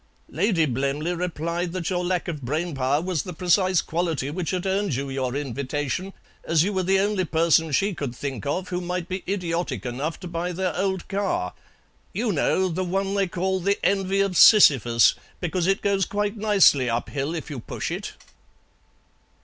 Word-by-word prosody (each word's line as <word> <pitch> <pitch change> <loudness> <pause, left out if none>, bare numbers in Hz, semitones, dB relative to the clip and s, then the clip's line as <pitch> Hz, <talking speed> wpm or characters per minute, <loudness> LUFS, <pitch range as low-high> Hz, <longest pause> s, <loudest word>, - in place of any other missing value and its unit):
Lady 175 0 +2
Blemley 140 +5 -1
replied 170 0 -3
that 185 -1 -3
your 180 -1 0
lack 180 0 -1
of 155 -4 -4
brain 155 +7 -2
power 135 +1 +1
was 180 -5 -1
the 180 - -7
precise 185 +2 +2
quality 160 -5 -2
which 175 +1 -3
had 185 0 -2
earned 195 -5 0
you 135 +1 -3
your 130 -1 -2
invitation, 145 +6 -3 0.3
as 165 -1 +3
you 205 +3 -1
were 190 - 0
the 190 +2 +2
only 200 -1 +1
person 165 -1 +2
she 195 +8 +1
could 140 -7 -5
think 135 -5 -5
of 180 +6 -2
who 180 0 -2
might 180 0 -3
be 185 0 -4
idiotic 170 - -2
enough 135 +7 -3
to 180 - -7
buy 170 +1 -3
their 180 -1 -2
old 190 -1 -1
car. 195 - -1 0.6
You 220 +3 0
know, 185 +3 +1
the 185 +1 -2
one 195 +2 -1
they 200 -1 +1
call 190 +2 -1
'The 200 +3 +1
Envy 195 0 +2
of 195 -2 0
Sisyphus,' 130 - +7 0.3
because 180 0 -1
it 195 0 +1
goes 195 -2 +2
quite 205 0 -1
nicely 200 - +4
up 115 +1 -2
hill 145 +4 -2
if 160 -1 -6
you 140 - -5
push - - -5
it." - - -5
175 Hz, 185 wpm, -24 LUFS, 145-190 Hz, 0.6 s, Sisyphus